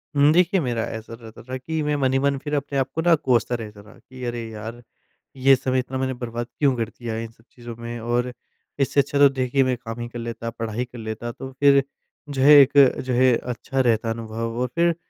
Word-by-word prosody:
उम, 145 +1 +5
देखिए 180 +2 +3
मेरा 120 -7 -1
ऐसा 115 0 -7
रहता 115 -1 -12
था 130 +2 -5
कि 160 +5 -3
मैं 150 0 0
मन 135 -2 +1
ही 135 - +3
मन 140 0 +1
फिर 145 0 -5
अपने 140 0 -2
आप 135 0 0
को 160 - 0
ना 170 +1 +4
कोसता 125 -5 +1
रहता 105 -3 -8
था 105 - -17
कि, 130 -1 -12
"अरे 120 -1 -4
यार! 110 +2 -8 0.6
ये 135 +1 +5
समय 130 0 -1
इतना 130 +1 -3
मैंने 130 0 -1
बर्बाद 120 -1 -5
क्यों 140 -3 +3
कर 115 -2 -2
दिया 115 -1 -6
इन 115 0 -5
सब 115 0 -25
चीज़ों 120 -1 -10
में? 120 0 -6
और 120 +2 -1 0.5
इससे 140 +1 +2
अच्छा 140 +1 -1
तो 140 0 +8
देखिए 135 0 0
मैं 130 -1 0
काम 115 -1 -8
ही 120 - -4
कर 120 - -8
लेता 115 0 -5
पढ़ाई 115 +1 -4
कर 125 0 -12
लेता।" 110 +1 -5
तो 130 +2 -8
फिर 140 -1 +6 0.5
जो 140 -2 -2
है, 145 +2 +8
एक 135 - +5 0.3
जो 130 -1 -3
है 130 0 +4
अच्छा 125 +3 -3
रहता 115 -3 +2
अनुभव 115 0 -4
और 125 - 0
फिर 170 0 +3
125 Hz, 235 wpm, -23 LUFS, 115-135 Hz, 0.6 s, तो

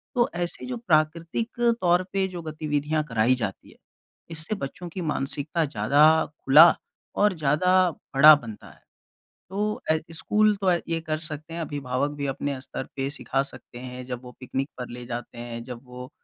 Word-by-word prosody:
तो 240 -1 +3
ऐसे 175 0 -3
जो 250 -1 -4
प्राकृतिक 170 +4 0 0.2
तौर 175 0 +3
पे 195 -1 +1
जो 180 -2 -7
गतिविधियाँ 155 -1 -1
कराई 115 +2 +3
जाती 105 -6 -5
हैं, - - -18 0.5
इससे 160 +6 0
बच्चों 175 +1 -6
की 180 +2 -6
मानसिकता 150 +1 -1
ज़्यादा 140 +3 +2 0.4
खुला 150 +6 +8 0.4
और 210 0 +3
ज़्यादा 180 +5 +3 0.3
बड़ा 150 +3 +10
बनता 115 -7 -9
है। - - -19 0.7
तो 210 +2 -2
ऐ 160 - +3 0.2
स्कूल 210 +5 +2
तो 190 -2 +3
ऐ 175 - +2
ये 165 0 0
कर 155 -1 -2
सकते 155 0 -5
हैं, 170 - -4
अभिभावक 140 -2 -2
भी 140 - -3
अपने 135 0 -3
स्तर 135 - -6
पे 135 0 -2
सिखा 135 -2 -1
सकते 120 -3 -11
हैं, 125 0 -7
जब 125 -1 -5
वो 125 - -10
पिकनिक 135 +2 -3
पर 125 -1 -6
ले 120 0 -8
जाते 120 0 -6
हैं, 120 0 -6
जब 120 -1 -8
वो 125 0 -10
150 Hz, 175 wpm, -25 LUFS, 130-175 Hz, 0.7 s, बड़ा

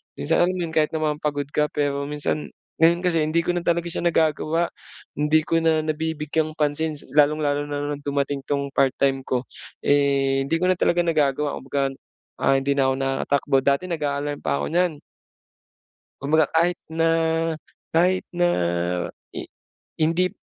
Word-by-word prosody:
Minsan 160 +3 0
alam 185 - -1
mo 180 - -2
yun, 165 - -4
kahit 155 -1 +1
naman 155 -1 -1
pagod 145 -2 -1
ka, 150 0 +1
pero 140 -1 -1
minsan 150 +1 -2 0.3
ngayon 165 +1 +5
kasi 175 -2 +2
hindi 155 +2 +1
ko 175 - 0
na - - +1
talaga 170 0 0
siya - - -3
nagagawa. 165 0 +1 0.5
Hindi 150 +2 +2
ko 165 - +2
na 160 -1 +3
nabibigyang 155 0 -2
pansin 150 +1 0 0.2
lalong-lalo 145 -1 +2
na 145 0 -3
nung 145 - -4
dumating 140 0 -1
'tong 140 -1 -1
part-time 135 0 +1
ko, 125 -1 0 0.4
eh, 140 -1 +2
hindi 165 - +1
ko 180 - +1
na - - +2
talaga 175 0 +2
nagagawa. 150 -3 +1
Kumbaga, 135 0 -1 0.5
ah, 135 - +3
hindi 135 +1 -1
na 135 -1 +3
ako - - 0
nakakatakbo. 135 +1 0
Dati 140 +4 +2
nag-a-alarm 145 -2 -2
pa 70 -2 0
ako - - -2
niyan. 175 -1 +2 1.3
Kumbaga 150 +2 +2
kahit 170 +2 +2 0.2
na 165 0 +2 0.9
kahit 185 +3 +2
na 175 0 +3 0.8
i - - -7 0.5
hindi 165 +3 +2
150 Hz, 160 wpm, -23 LUFS, 140-165 Hz, 1.3 s, ngayon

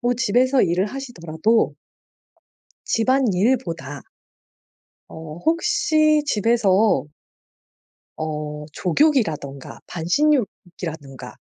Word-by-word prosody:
뭐 245 0 +1
집에서 255 +3 +2
일을 180 +3 +1
하시더라도 220 -5 -1 1.1
집안일보다 235 -3 +1 1.3
어 160 0 -9
혹시 320 -4 +2
집에서 210 - +2 1.1
어 150 -1 -5
족욕이라든가 165 - 0
반신욕이라든가 175 - -2
210 Hz, 190 characters per minute, -22 LUFS, 160-265 Hz, 1.3 s, 집에서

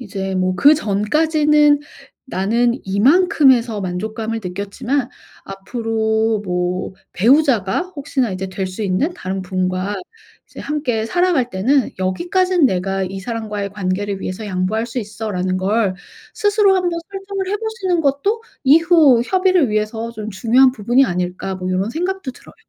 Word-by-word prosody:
이제 195 -5 -4
뭐 185 0 0
그전까지는 295 - +3 0.5
나는 235 +3 +1
이만큼에서 245 - +3
만족감을 220 +5 -4
느꼈지만 205 +8 -3 0.4
앞으로 220 +2 -1
뭐 180 +1 -2 0.2
배우자가 235 - +3 0.2
혹시나 270 -5 -1
이제 185 +1 -4
될 190 0 -4
수 185 +4 -6
있는 205 - 0
다른 190 +1 -4
분과 185 +1 -2 0.5
이제 - - -15
함께 265 -7 -2
살아갈 350 -6 +1
때는 245 +7 +1
'여기까지는 350 - +1
내가 195 -1 -1
이 190 +1 -6
사람과의 210 -3 -4
관계를 195 0 -3
위해서 205 +4 -5
양보할 195 +4 -1
수 245 +2 -5
있어.'라는 200 -4 -3
걸 200 0 +1 0.4
스스로 410 -1 +3
한번 350 -2 -1
설정을 390 -1 -5
해 415 - 0
보시는 410 -6 -2
것도 345 +12 0 0.2
'이후 310 -4 +5
협의를 370 - +2
위해서 215 +2 -2
좀 215 -1 -6
중요한 245 +6 +4
부분이 240 +4 +2
아닐까?' 180 +1 -3
뭐 185 0 -4
요런 190 +4 -1
생각도 360 -1 -3
들어요. - - -17
225 Hz, 320 characters per minute, -19 LUFS, 190-295 Hz, 0.5 s, 이후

